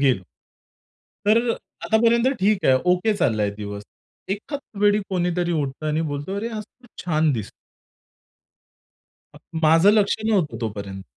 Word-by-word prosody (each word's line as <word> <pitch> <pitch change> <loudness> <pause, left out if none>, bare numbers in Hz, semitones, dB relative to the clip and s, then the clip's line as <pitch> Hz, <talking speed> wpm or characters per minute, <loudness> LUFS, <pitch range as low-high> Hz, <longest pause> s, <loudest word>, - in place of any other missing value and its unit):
गेलो. 130 -9 +2 1.0
तर, 215 +2 +6 0.5
आतापर्यंत 230 +2 +3
ठीक 200 0 +2
आहे. 130 - +5 0.2
ओके 210 +4 +1
चाललाय 105 - +1
दिवस. 100 -1 -6 0.5
एकाच 275 +9 -4 0.2
वेळी 205 0 +4
कोणीतरी 175 -1 0
उठतं 150 -1 -2
आणि 155 +1 0
बोलतो, 145 +7 -4
अरे, 225 +3 -2
आज 215 -2 -5
तू 245 +3 -24 0.2
छान 155 -3 +2
दिसतो. 110 -5 -4 1.8
अ, - - -13 0.2
माझं 165 +6 +6
लक्ष 205 -2 +3
नव्हतं 195 -9 +1
तोपर्यंत 100 -3 -5
175 Hz, 130 wpm, -23 LUFS, 135-210 Hz, 1.8 s, तर